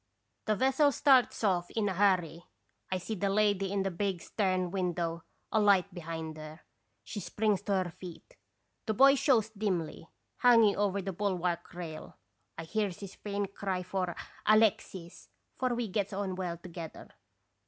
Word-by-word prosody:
The 215 - +3
vessel 270 +5 +3
starts 260 -3 +3
off 180 -4 +1
in 215 -2 -1
a 195 - 0
hurry. 180 -4 +1 0.5
I 185 - +1
see 185 +5 -5
the 200 -1 -1
lady 200 -1 +2
in 200 -1 0
the 195 - -1
big 190 0 -2
stern 185 -2 -1
window, 170 -3 -2 0.3
a 220 - +3
light 200 -3 +3
behind 160 -2 -6
her. 155 +1 -10 0.4
She 210 - -6
springs 210 -1 0
to 200 - -2
her 175 - -7
feet. 180 - -11 0.5
The 220 - 0
boy 275 +4 +7
shows 255 -6 +2
dimly, 185 -7 -3 0.3
hanging 230 -5 +5
over 200 -1 0
the 195 0 -3
bulwark 180 -3 -2
rail; 165 -3 -8 0.4
I 165 - -5
hears 200 +1 -2
his 195 -1 -8
faint 200 -1 -4
cry 190 -3 -2
for 185 -1 -2 0.3
'Alexis! 205 -5 +1
' - - -45
for 255 -2 +1
we 235 -1 -2
gets 200 0 -2
on 195 -1 -2
well 180 -2 -3
together. 170 -2 -9
195 Hz, 165 wpm, -31 LUFS, 175-210 Hz, 0.5 s, boy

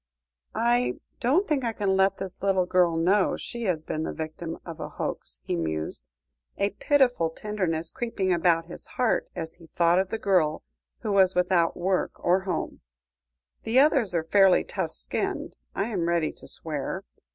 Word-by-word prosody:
"I 240 +2 +2 0.2
don't 290 +11 +2
think 290 -4 +1
I 230 -1 -1
can 200 -3 0
let 195 0 +3
this 190 -2 -7
little 190 -2 +2
girl 180 -2 +3
know 185 +4 +3
she 235 -1 -5
has 170 -5 0
been 155 - -3
the - - -2
victim 160 +1 -5
of 165 -2 -8
a - - -5
hoax," - - -4
he - - -2
mused, 80 -6 -3 0.5
a 200 0 +1
pitiful 245 - +2
tenderness 170 -4 -2
creeping 225 -7 -1
about 170 -1 +2
his 175 - -10
heart 250 -3 0
as 160 0 -4
he 165 -2 -16
thought 170 +2 +3
of 190 0 0
the 225 - -2
girl 180 -8 +1 0.4
who 215 - -2
was 190 -2 +4
without 180 -2 +2
work 185 +1 0
or 180 +2 +2
home; 190 -1 -4 0.8
"the 230 +3 0
others 265 - +4
are 165 - +1
fairly 195 +2 +5
tough - - -3
skinned, - - -2 0.2
I 195 +4 -1
am 175 -6 -1
ready 170 -2 +1
to - - -14
swear. 150 -4 -3
185 Hz, 175 wpm, -26 LUFS, 165-210 Hz, 0.8 s, fairly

